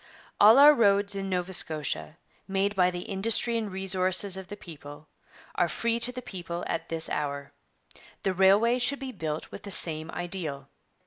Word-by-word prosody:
'All 215 +4 +7
our 290 +2 +8
roads 200 -4 +2
in 195 -1 -5
Nova 180 0 -3
Scotia, 155 -1 -1 0.3
made 195 +1 -1
by 180 -1 +3
the 175 -1 -6
industry 220 +5 0
and 220 -3 -3
resources 190 0 +2
of 190 -1 -8
the 205 +2 -9
people, 145 -4 -12 0.5
are 175 - +1
free 230 +7 -2
to 240 +1 +2
the 250 0 -8
people 175 -4 -6
at - - -4
this 165 -1 -1
hour.' 140 -1 -4 0.7
The 190 - 0
railway 200 +6 +3
should 275 +3 0
be 270 -1 -7
built 155 -8 -6
with - - -9
the 200 - -10
same 160 -4 +1
ideal. 165 -7 -6
190 Hz, 175 wpm, -27 LUFS, 165-205 Hz, 0.7 s, our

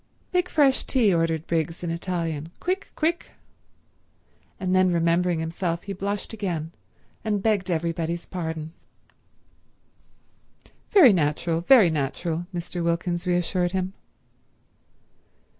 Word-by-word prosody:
"Make 360 0 +1
fresh 275 -3 +3
tea," 230 -8 +3
ordered 165 -1 0
Briggs 165 +1 -2
in 170 - -2
Italian. 165 -3 -3
"Quick—quick—" 345 -3 -1 1.3
And 185 0 0
then 185 -1 +4
remembering 170 0 +2
himself 165 +1 -2
he 200 - -5
blushed 200 +3 -4
again, 175 -7 -3 0.5
and 210 -3 -1
begged 205 -4 +1
everybody's 170 0 -2
pardon. 160 -3 -5 2.2
"Very 300 - +7
natural, 165 0 0
very 200 -2 +6
natural," 160 +4 -2
Mr. 175 0 -4
Wilkins 170 +1 -1
reassured 180 0 0
him. 190 0 -1
175 Hz, 105 wpm, -25 LUFS, 165-195 Hz, 2.2 s, Very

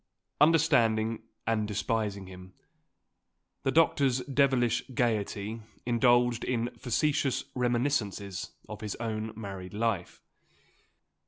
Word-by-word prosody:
Understanding 120 -9 +3 0.2
and 110 -2 +1
despising 105 -1 -1
him, 90 0 -12 1.1
the 135 - 0
doctor's 140 -4 +3
devilish 130 -3 +2
gaiety 110 -1 -1 0.2
indulged 120 0 +3
in 120 -1 -1
facetious 135 +1 0
reminiscences 120 -6 -1 0.2
of 105 -1 -8
his 105 -2 -4
own 110 -1 -3
married 100 -3 -7
life. 105 -5 -1
115 Hz, 90 wpm, -29 LUFS, 105-125 Hz, 1.1 s, Understanding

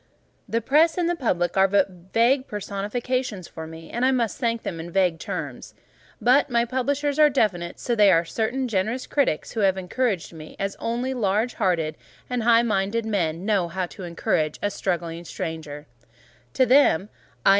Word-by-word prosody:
The 230 - 0
Press 310 - +3
and 350 -2 +1
the 350 - +1
Public 175 - 0
are 190 0 +5
but 195 0 +3 0.2
vague 255 +4 +3
personifications 210 +1 -3
for 160 0 -8
me, 160 0 -11
and 240 - -2
I 260 - +5
must 240 -4 0
thank 230 -3 -1
them 165 - -4
in 165 +1 -6
vague 180 -2 +1
terms; - - -6 0.4
but 260 +4 +4
my 235 -1 +2
Publishers 280 +4 -1
are 300 -1 +7
definite: 185 -10 0
so 240 - -1 0.2
are 170 -2 +4
certain 240 +8 -1
generous 220 +4 -1
critics 275 - 0
who 225 - -4
have 190 -2 +3
encouraged 190 -1 -2
me 155 -1 -11
as 195 0 -3
only 240 +3 -2
large 220 0 0
hearted 175 -7 0 0.3
and 250 -1 0
high 230 +1 +5
minded 215 +1 0
men 175 -5 -1
know 200 -5 +2
how 180 +2 -2
to 190 - -12
encourage 160 -3 -1
a 205 - +1
struggling 170 -3 -3
stranger; 155 -3 -6 0.7
to 260 - +4
them, 250 - +4 0.4
_i. - - +7
210 Hz, 175 wpm, -24 LUFS, 175-250 Hz, 0.7 s, are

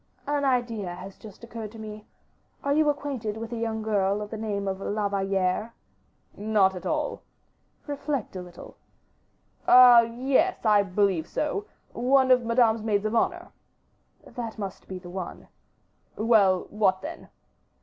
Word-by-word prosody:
"An 290 0 -1
idea 235 -8 -1
has 190 +2 -10
just 215 +1 -14
occurred 230 -2 -7
to - - -11
me. 215 -1 -9 0.6
Are 280 - +1
you 305 0 +3
acquainted 270 -7 -3
with 225 +1 -6
a - - -3
young 225 -1 -3
girl 200 -2 +1
of 210 - -10
the - - -4
name 205 -2 -3
of 190 0 -2
La 205 +1 -1
Valliere? 195 +2 -1 0.6
"Not 205 -2 +2
at 180 - -6
all." 305 -2 -2 0.6
"Reflect 285 -6 -3
a 185 - -4
little." 180 -1 -12 0.9
"Ah! 250 -1 +9
yes, 260 +9 0
I 210 -2 +5
believe 190 -4 0
so; 355 +7 -2 0.3
one 260 +2 +3
of 250 -1 +5
Madame's 230 -1 +3
maids 210 -1 0
of 215 - -1
honor." - - 0 0.7
"That 230 -2 -7
must 195 -3 -7
be 190 - -6
the 175 -1 -10
one." 185 -1 -7 0.7
"Well, 210 -5 +3
what 195 -3 +1
then?" 325 +3 -8
220 Hz, 150 wpm, -26 LUFS, 200-245 Hz, 0.9 s, Ah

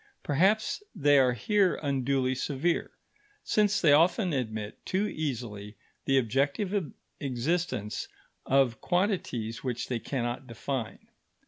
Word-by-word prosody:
Perhaps 195 - +2
they 145 -5 +5
are 125 -2 +4
here 190 - +2
unduly 135 -2 0
severe, 145 +6 -1 0.5
since 205 -2 +2
they 155 - +5
often 175 +4 +3
admit 110 -5 -4
too 195 +3 0
easily 115 - -4 0.3
the 135 -1 +3
objective 140 - 0 0.3
existence 130 - -2 0.4
of 130 -4 +2
quantities 175 - -1
which 125 -3 -3
they 125 -2 -1
cannot 125 +1 -3
define. 120 0 -5
135 Hz, 110 wpm, -29 LUFS, 120-175 Hz, 0.5 s, they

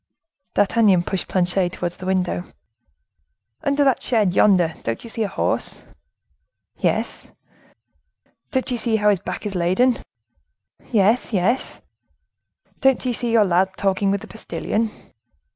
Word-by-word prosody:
D'Artagnan 205 -4 +4
pushed 190 +1 -3
Planchet 180 0 +1
towards 175 -1 -4
the 185 - -7
window. 185 -1 0 1.2
"Under 285 0 +2
that 270 -3 +2
shed 215 -7 +1
yonder, 180 -5 +4
don't 115 0 -4
you 230 - -8
see 225 - -4
a 215 - +1
horse?" 195 - -2 1.0
"Yes." - - -1 1.2
"Don't 260 -3 -1
you 245 - 0
see 230 -1 0
how 210 -1 +4
his 195 - 0
back 200 - -6
is 205 - -3
laden?" 190 +8 +2 0.9
"Yes, 220 +2 +2
yes!" 200 +7 0 1.0
"Don't 270 -1 +2
you 250 - 0
see 235 0 -1
your 225 -2 +5
lad 185 +1 +1
talking 195 0 +1
with 200 0 0
the - - -10
postilion?" 225 0 -3
200 Hz, 135 wpm, -22 LUFS, 185-230 Hz, 1.2 s, your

